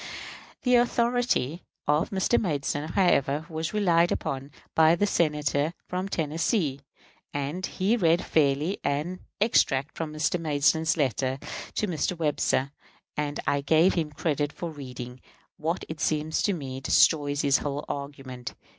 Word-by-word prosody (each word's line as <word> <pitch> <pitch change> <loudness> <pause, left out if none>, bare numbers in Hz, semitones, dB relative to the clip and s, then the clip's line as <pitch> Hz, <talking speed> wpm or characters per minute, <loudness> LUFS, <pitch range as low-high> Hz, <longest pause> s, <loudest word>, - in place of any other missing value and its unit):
] - - -18
The 250 -1 +5
authority 240 - +1 0.3
of 150 +2 +2
Mr. 195 +4 +2
Madison, 150 -3 -2
however, 155 -5 +2
was 160 -1 -3
relied 175 -5 +3
on 135 +1 -3 0.2
by 160 +1 +5
the 205 - +2
Senator 150 -3 +1
from 185 +2 -3
Tennessee; 160 - 0 0.6
and 145 +6 -3
he 200 +5 +1
read 170 -5 +2
fairly 150 +4 +1
an 150 +6 -1 0.2
extract 150 - +2
from 160 -2 -4
Mr. 155 +3 0
Madison's 160 +1 +2
letter 130 -2 0 0.4
to - - +1
Mr. 175 0 -1
Webster, 145 -3 +1 0.4
and 150 -1 -2
I 140 - +1
give 160 +6 +4
him 160 -4 -1
credit 145 -1 -1
for 170 +1 -5
reading 125 -3 -8 0.4
what 165 +4 -2
it 160 -1 -7
seems 155 +1 0
to 205 - +2
me 135 -6 -5
destroys 145 0 +3
his 140 -1 +3
whole 145 0 -3
argument. 135 -4 -6
155 Hz, 140 wpm, -27 LUFS, 140-175 Hz, 0.6 s, The